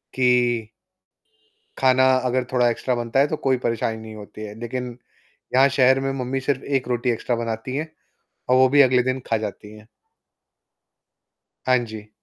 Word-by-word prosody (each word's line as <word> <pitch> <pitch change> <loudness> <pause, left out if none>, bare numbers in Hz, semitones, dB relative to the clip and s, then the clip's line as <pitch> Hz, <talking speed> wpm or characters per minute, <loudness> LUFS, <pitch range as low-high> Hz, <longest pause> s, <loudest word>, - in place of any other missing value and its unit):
कि 120 -3 +2 1.1
खाना 130 0 +4 0.2
अगर 125 0 0
थोड़ा 125 -1 +3
एक्स्ट्रा 125 +2 -1
बनता 120 +2 0
है 140 - +4
तो 155 - -2
कोई 130 -1 +4
परेशानी 115 -2 -1
नहीं 110 0 -10
होती 105 0 -10
है 105 -1 -8
लेकिन, 120 0 -5 0.6
यहाँ 135 +1 +6
शहर 130 -1 +4
में 135 0 -2
मम्मी 130 +2 -2
सिर्फ़ 135 0 -1 0.2
1 125 - -15
रोटी 125 0 -1
एक्स्ट्रा 120 +1 -2
बनाती 115 +2 -4
हैं 155 +2 -4 0.6
और 125 - +4
वो 130 0 +6
भी 145 +2 +4
अगले 125 -1 +4
दिन 130 +1 -2
खा 115 - +1
जाती 105 +1 -10
हैं। 105 - -17 1.8
हाँ 130 0 +4
जी। 110 -2 -9
125 Hz, 165 wpm, -22 LUFS, 115-130 Hz, 1.8 s, यहाँ